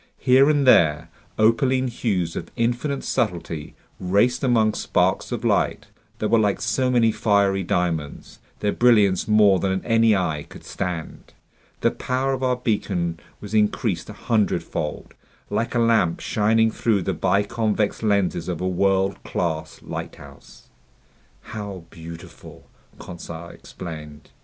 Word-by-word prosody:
Here 130 +3 +4
and 145 -2 +2
there, 80 -10 +4 0.3
opaline 130 +4 +2
hues 100 -9 -2
of 85 - -5
infinite 120 +4 -1
subtlety 85 -7 -3 0.2
raced 105 +8 +1
among 115 -4 +3
sparks - - 0
of - - -3
light - - +1 0.3
that 105 - -2
were 115 - +4
like 105 -2 +1
so 115 +4 0
many 120 -3 +3
fiery 100 -3 +2
diamonds, 85 -5 -3 0.2
their 105 - +1
brilliance 105 -7 +3
more 105 -3 +5
than 95 +1 -1
any 115 -2 +4
eye 80 -6 -2
could - - -12
stand. 90 -4 -6 0.5
The - - +3
power 130 +1 -1
of 130 - -3
our 130 -1 +1
beacon 95 -8 -2 0.2
was 105 0 -9
increased 105 -1 0
a - - -7
hundredfold, 105 -8 -2 0.4
like 115 +2 -1
a - - +3
lamp 110 -8 +2
shining 110 +1 +2
through 110 -4 0
the - - -1
biconvex 105 +1 0
lenses 100 -6 0
of 90 -3 -3
a 95 - -1
world 95 +1 +1
class 80 -2 -3
lighthouse. - - -10 0.7
"How 100 -4 -7
beautiful!" 85 0 -11 0.3
Conseil 85 -1 -9
exclaimed. 75 -5 -10
105 Hz, 135 wpm, -23 LUFS, 90-115 Hz, 0.7 s, more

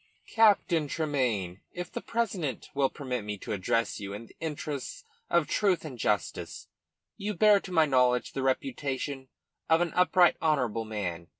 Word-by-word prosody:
"Captain 200 -8 +4
Tremayne 125 - -1
if 175 -1 -6
the - - -5
president 200 - -2
will 140 -1 +2
permit 125 -5 -4
me 105 0 -4
to - - -7
address 105 +3 0
you 100 -1 -6
in 105 +3 -7
the - - -19
interests 150 -3 -5 0.3
of 170 -3 +3
truth 190 -6 +1
and 130 -6 -8
justice 105 -1 -2 0.5
you 210 +1 -3
bear, 210 +2 +6
to 195 - -10
my 160 -3 +5
knowledge, 125 -3 +2
the 135 - -2
reputation 135 - -2 0.4
of 160 0 +5
an 175 -1 0
upright, 180 0 +4
honourable 125 -8 +1
man. 90 -6 -4
140 Hz, 160 wpm, -29 LUFS, 115-175 Hz, 0.5 s, bear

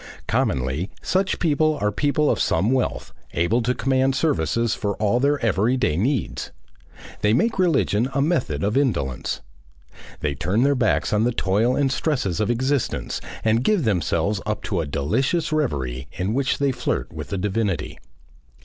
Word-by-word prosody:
Commonly 65 +8 0
such 190 +1 +1
people 155 -1 +2
are 105 0 +1
people 145 +6 +1
of - - -1
some 95 +8 +2
wealth, 130 -1 -1 0.2
able 95 +9 +1
to 125 +2 0
command 130 0 +1
services 115 - +1
for 100 -1 -2
all 110 +3 +1
their 145 +2 +2
everyday 110 -3 +2
needs. 115 - -1 0.7
They 105 +1 +2
make 220 - +1
religion 135 - +2
a 135 - -1
method 140 - 0
of 105 +2 0
indolence. 75 - 0 0.8
They 75 -1 0
turn 90 - 0
their 140 +1 +4
backs 120 -6 +1
on 105 +1 +3
the 120 - +2
toil 110 +4 +1
and 140 -2 +1
stresses 130 - -1
of 110 0 0
existence 130 +3 -1 0.2
and 115 +2 +2
give 205 -2 +2
themselves 95 -2 0
up 105 -1 -3
to 95 -5 -1
a 80 - -4
delicious 115 - 0
reverie 65 - -1
in 95 +4 -2
which 135 +1 +1
they 140 -1 +1
flirt 125 - -2
with - - -6
the 100 - -3
divinity. 95 -4 -2
115 Hz, 160 wpm, -23 LUFS, 95-140 Hz, 0.8 s, their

